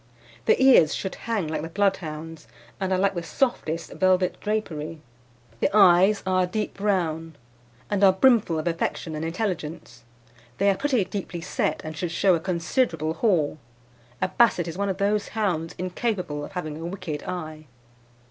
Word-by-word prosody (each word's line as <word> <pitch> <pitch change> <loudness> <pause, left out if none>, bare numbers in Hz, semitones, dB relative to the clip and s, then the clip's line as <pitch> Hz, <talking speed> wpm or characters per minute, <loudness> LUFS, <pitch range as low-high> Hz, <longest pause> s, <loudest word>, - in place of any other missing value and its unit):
"The - - +4
ears 260 - +6
should 190 - -4
hang 220 -7 -2
like 155 - -2
the 165 - -6
Bloodhound's, 165 -5 -2 0.3
and 190 -1 -2
are 185 - +3
like 195 +1 +2
the 175 - -3
softest 170 - -1
velvet 185 -1 +2
drapery. 165 -7 -3 0.6
"The - - +2
eyes 195 +1 +6
are 185 0 +2
a 180 - +1
deep 210 +4 -3
brown, 165 -6 -1 0.5
and 205 -1 0
are 195 - +8
brimful 200 -4 +3
of 155 - -3
affection 165 -1 -2
and 155 +1 -4
intelligence. 165 - -4 0.5
They 200 +1 +4
are - - 0
pretty 255 -3 +1
deeply 185 -3 -5
set, 165 - -1
and 155 0 -6
should 175 +2 -3
show 185 +2 +3
a 170 - +2
considerable 170 - 0
haw. 165 -8 +1 0.7
A 185 - +1
Basset 185 -4 +3
is 165 - -5
one 200 +1 -1
of 190 - -2
those 205 +1 +1
hounds 170 -7 -1
incapable 180 -5 -2
of 170 - -9
having 155 -5 -4
a - - -5
wicked 175 -5 -5
eye. 155 -4 -6
180 Hz, 165 wpm, -25 LUFS, 160-200 Hz, 0.7 s, are